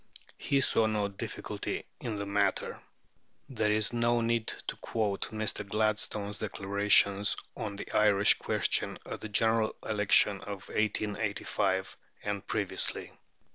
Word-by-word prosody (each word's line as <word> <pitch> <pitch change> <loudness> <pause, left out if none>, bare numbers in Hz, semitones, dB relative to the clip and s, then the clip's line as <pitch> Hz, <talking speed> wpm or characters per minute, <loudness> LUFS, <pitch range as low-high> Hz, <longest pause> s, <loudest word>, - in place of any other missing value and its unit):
He 140 -1 +1
saw 115 -3 +3
no 105 -2 0
difficulty 100 - -5
in 115 -3 -4
the 100 0 -3
matter." 100 -1 0 0.7
There 110 -6 0
is 105 +1 +1
no 120 0 +2
need 115 -1 0
to - - -4
quote 105 -4 -1
Mr. 110 -1 -2
Gladstone's 105 0 -1
declarations 100 0 +3 0.2
on 105 -2 -4
the 100 - -6
Irish 105 -2 +5
question - - 0
at - - -6
the 110 - -6
General 110 +1 +2
Election 105 -1 +3
of 100 -2 -7
1885, 105 -3 -1 0.3
and 100 -1 -3
previously. - - -2
105 Hz, 125 wpm, -30 LUFS, 100-110 Hz, 0.7 s, Irish